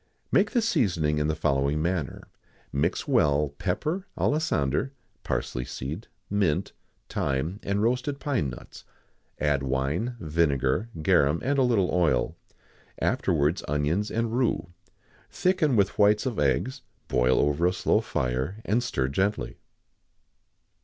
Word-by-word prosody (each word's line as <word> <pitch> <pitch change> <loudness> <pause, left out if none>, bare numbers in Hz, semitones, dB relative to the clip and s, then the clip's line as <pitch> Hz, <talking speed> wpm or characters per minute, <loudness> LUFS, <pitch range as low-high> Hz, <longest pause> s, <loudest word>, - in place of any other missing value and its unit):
_ - - -41 0.3
Make - - +4
the 240 -3 +1
seasoning 90 - +1
in 75 - +1
the 80 - 0
following 70 -1 +1
manner: 85 -3 -2 0.5
mix 70 - 0
well, 75 0 +3
pepper, 155 - -2
alisander, 135 - 0 0.3
parsley 60 - -2
seed, 75 - -6 0.2
mint, 95 -7 0 0.3
thyme, 75 +9 -2
and 100 0 -1
roasted 125 +4 0
pine 130 - 0
nuts; 65 - -11 0.6
add 75 -2 +1
wine, 70 - -1
vinegar, 75 - +1
garum, 75 +2 +3
and 140 +2 +1
a - - +5
little 115 -8 +2
oil; 80 -9 +2 0.6
afterwards 75 +5 +1
onions 75 +8 0
and 115 0 -1
rue; 125 -8 0 0.6
thicken 180 -7 +1
with 100 -1 +1
whites 105 +3 +4
of 125 - -2
eggs; 75 - 0 0.3
boil 65 0 +2
over 75 +4 +2
a - - +2
slow 90 - +1
fire, 65 - -2
and 110 +5 +2
stir 70 - -1
gently. 85 - -1
85 Hz, 130 wpm, -27 LUFS, 70-115 Hz, 0.6 s, a